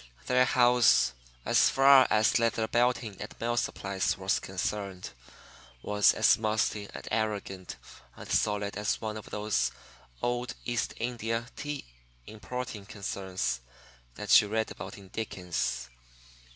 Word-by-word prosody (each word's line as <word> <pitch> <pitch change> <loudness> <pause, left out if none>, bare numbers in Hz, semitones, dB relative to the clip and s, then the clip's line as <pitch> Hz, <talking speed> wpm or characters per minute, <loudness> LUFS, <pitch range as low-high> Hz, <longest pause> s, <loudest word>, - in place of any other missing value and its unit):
Their 125 0 +4
house, 125 - +4 0.3
as - - +4
far 135 -1 +7
as 110 +2 +3
Leather 115 -1 +1
Belting 120 -4 +1
and - - -7
Mill 120 +1 -1
Supplies 100 -4 -1
was 95 0 0
concerned, 95 0 -4 0.7
was 105 0 +4
as - - +4
musty 110 -1 0
and - - -9
arrogant 105 -4 -2 0.4
and - - -10
solid 105 -1 0
as 105 -1 -1
one 110 -1 -4
of 110 - -9
those 105 0 0 0.5
old 120 0 -1
East 120 -2 -2
India 115 -1 -2
tea 145 -1 -5 0.4
importing 110 -1 -6
concerns 95 - -3 0.5
that 105 - +6
you 105 - -4
read 110 +1 -1
about - - -8
in 95 -2 -14
Dickens. 90 - -3
110 Hz, 125 wpm, -29 LUFS, 100-120 Hz, 0.7 s, far